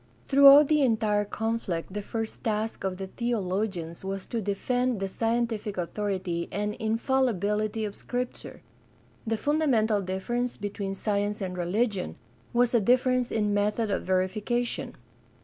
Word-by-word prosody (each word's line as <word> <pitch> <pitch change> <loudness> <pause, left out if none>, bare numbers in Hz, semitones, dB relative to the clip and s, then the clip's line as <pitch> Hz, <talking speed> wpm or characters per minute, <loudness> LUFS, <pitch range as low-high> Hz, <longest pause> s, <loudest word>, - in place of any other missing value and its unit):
Throughout 280 +1 +8
the 300 0 +3
entire 215 -5 +2
conflict 205 -6 -3
the 210 - -3
first 225 +2 -5
task 220 -1 -2
of 190 -1 -2
the 195 - -4
theologians 190 -6 -2
was 195 0 -4
to 230 - -3
defend 245 +4 0
the 195 - -1
scientific 225 -1 -1
authority 185 -2 -2
and 210 +1 -2
infallibility 220 -2 0
of 205 - -5
Scripture. 250 0 -5 0.6
The 225 0 +1
fundamental 240 -8 +2
difference 240 +7 -2
between 200 -1 -4
science 205 0 -1
and 185 -2 -4
religion 185 - -1 0.4
was 240 0 +2
a 235 - +4
difference 250 +2 +3
in 210 -2 +1
method 210 +1 +1
of - - 0
verification. 210 +6 -1
215 Hz, 130 wpm, -27 LUFS, 195-240 Hz, 0.6 s, Throughout